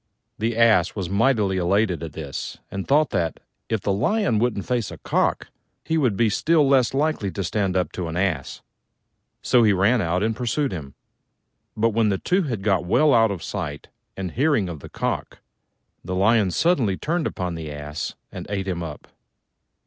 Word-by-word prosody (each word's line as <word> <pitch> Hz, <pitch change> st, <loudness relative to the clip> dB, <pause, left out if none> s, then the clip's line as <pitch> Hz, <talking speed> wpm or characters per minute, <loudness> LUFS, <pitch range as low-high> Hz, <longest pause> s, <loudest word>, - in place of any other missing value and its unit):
The 115 Hz, +1 st, -1 dB
Ass 110 Hz, -6 st, +4 dB
was 95 Hz, -3 st, -4 dB
mightily 105 Hz, -3 st, +2 dB
elated 95 Hz, +1 st, +1 dB
at 80 Hz, -3 st, -6 dB
this, 70 Hz, -4 st, -6 dB
and 95 Hz, 0 st, -5 dB
thought 150 Hz, +2 st, +3 dB
that, 85 Hz, -4 st, -1 dB, 0.3 s
if 110 Hz, -3 st, 0 dB
the 100 Hz, -, 0 dB
Lion 125 Hz, -, +1 dB
couldn't 115 Hz, -4 st, 0 dB
face 120 Hz, -4 st, -1 dB
a -, -, -9 dB
Cock, -, -, 0 dB, 0.4 s
he 160 Hz, -, 0 dB
would 125 Hz, -11 st, +1 dB
be 115 Hz, -, +3 dB
still 155 Hz, +7 st, +3 dB
less 135 Hz, -2 st, +3 dB
likely 145 Hz, -8 st, 0 dB
to 100 Hz, +1 st, -4 dB
stand 95 Hz, 0 st, 0 dB
up 90 Hz, -, 0 dB
to 90 Hz, -2 st, -4 dB
an 80 Hz, +1 st, -4 dB
Ass: 90 Hz, -8 st, -2 dB, 0.8 s
so 125 Hz, -, +4 dB
he 110 Hz, -3 st, +5 dB
ran 100 Hz, +6 st, +3 dB
out 90 Hz, +2 st, 0 dB
and 110 Hz, 0 st, 0 dB
pursued 125 Hz, +5 st, -1 dB
him. 75 Hz, -7 st, -7 dB, 0.8 s
But 115 Hz, +2 st, +3 dB
when 110 Hz, 0 st, +2 dB
the 95 Hz, -, +1 dB
two 185 Hz, -, +1 dB
had 120 Hz, -, -3 dB
got 100 Hz, -3 st, +2 dB
well 150 Hz, +12 st, +3 dB
out 115 Hz, -2 st, +5 dB
of 95 Hz, -4 st, -5 dB
sight 80 Hz, -8 st, -5 dB, 0.3 s
and 95 Hz, -3 st, -4 dB
hearing 130 Hz, -, +1 dB
of 80 Hz, -3 st, -6 dB
the -, -, -11 dB
Cock, -, -, -3 dB, 0.7 s
the 90 Hz, +1 st, -4 dB
Lion 105 Hz, +1 st, +3 dB
suddenly 120 Hz, -, +1 dB
turned 170 Hz, 0 st, -1 dB
upon 90 Hz, -2 st, -3 dB
the 80 Hz, -2 st, -6 dB
Ass 75 Hz, +1 st, -5 dB, 0.2 s
and -, -, -7 dB
ate 100 Hz, -1 st, -2 dB
him 90 Hz, -2 st, -2 dB
up. 80 Hz, -3 st, -7 dB
100 Hz, 185 wpm, -23 LUFS, 90-120 Hz, 0.8 s, he